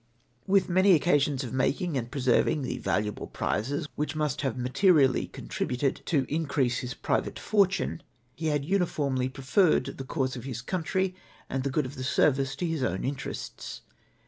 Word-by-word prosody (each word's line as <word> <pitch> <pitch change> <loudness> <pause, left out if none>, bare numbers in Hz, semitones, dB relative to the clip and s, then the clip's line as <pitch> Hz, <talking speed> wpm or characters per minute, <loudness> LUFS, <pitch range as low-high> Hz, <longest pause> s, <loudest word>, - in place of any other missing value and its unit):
With 195 0 +4
many 185 +1 +5
oc 150 - 0
casions 145 -4 +2
of 125 - -6
making 150 +5 0
and 120 -3 -2
preserving 135 +2 +2
the 125 - -3
valuable 105 +1 -1
j^rizes 140 +8 -1
which 150 +1 -2
must 150 -2 -1
have 135 -4 -1
materially 135 +2 +3
contributed 130 +2 -2
to 140 -6 +2
increase 140 -5 0
his 125 0 -5
private - - -1
fortune, 195 -5 +1 0.3
he 160 +3 -3
had 145 -2 0
uniformly 145 -8 0
preferred 135 +7 +2
the - - -3
cause 130 -1 -2
of 120 - -7
his 125 -3 -5
country 185 +3 -1 0.4
and 135 - 0
the 140 - 0
good 140 +1 0
of 130 - -6
the 130 - -6
service 135 0 +2
to 175 - -2
his 165 -4 -1
own 95 -7 -1
interests. 135 0 -5
140 Hz, 170 wpm, -28 LUFS, 130-160 Hz, 0.4 s, many